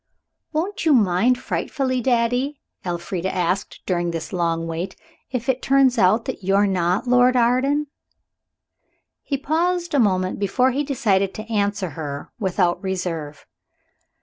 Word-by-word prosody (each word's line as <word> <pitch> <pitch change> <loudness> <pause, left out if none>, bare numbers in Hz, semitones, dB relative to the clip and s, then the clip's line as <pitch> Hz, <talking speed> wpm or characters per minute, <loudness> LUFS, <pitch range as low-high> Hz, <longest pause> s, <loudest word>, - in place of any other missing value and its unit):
"Won't 345 +6 -2
you 320 -3 +4
mind 220 +2 +3
frightfully, 255 -1 -2
daddy," 245 +3 +1 0.2
Elfrida 175 +1 -3
asked 180 +2 -2
during 175 -2 0
this 165 0 -5
long 165 -2 0
waiting, 165 +3 -4 0.3
"if 245 -2 -4
it 260 -1 +1
turns 270 -3 +3
out 215 +4 +4
that 260 -7 -5
you're 195 +2 +3
not 185 0 0
Lord 250 +1 +4
Arden?" 255 +5 +2 1.4
He 280 - -2
paused 340 +4 0
a 285 - +3
moment 185 -5 +1
before 250 +6 +2
he 280 +3 -1
decided 200 -9 +1
to 215 - -5
answer 200 -4 0
her 145 -1 -6
without 180 -3 +1
reserve. 165 -6 -4
205 Hz, 135 wpm, -22 LUFS, 180-260 Hz, 1.4 s, you